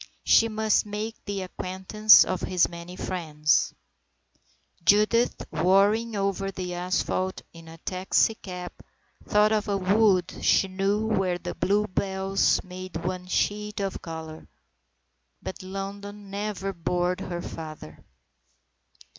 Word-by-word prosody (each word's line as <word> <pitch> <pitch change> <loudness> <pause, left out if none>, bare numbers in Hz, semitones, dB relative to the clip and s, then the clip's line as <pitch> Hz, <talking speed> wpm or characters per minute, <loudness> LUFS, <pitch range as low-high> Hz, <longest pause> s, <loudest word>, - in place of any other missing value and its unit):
She 230 - +5
must 220 -1 +2
make 210 +2 -4
the 200 -2 -3
acquaintance 190 +4 +4
of 185 - -2
his 180 -2 +2
many 170 +1 -9
friends. 155 -5 0 1.1
Judith 215 +5 +3
whirring 205 +5 +3
over 195 -1 -1
the 185 -2 -5
asphalt, 185 +1 -1
in 165 -1 -13
a 165 0 -11
taxi 185 +5 +1
cab, 180 -4 -8 0.6
thought 210 +1 +4
of 215 0 +1
a 200 -1 +1
wood 195 -1 +3
she 195 - +4
knew 195 +3 0
where 190 -5 0
the - - -6
bluebells 195 -1 +1
made 185 -2 -7
one 180 0 -3
sheet 210 +2 -1
of 195 -2 -3
colour. 160 -1 -8 0.9
But - - -7
London 200 +1 -7
never 200 -1 -3
bored 180 +1 -1
her 175 -1 -5
father. 155 - -9
190 Hz, 120 wpm, -26 LUFS, 180-205 Hz, 1.1 s, She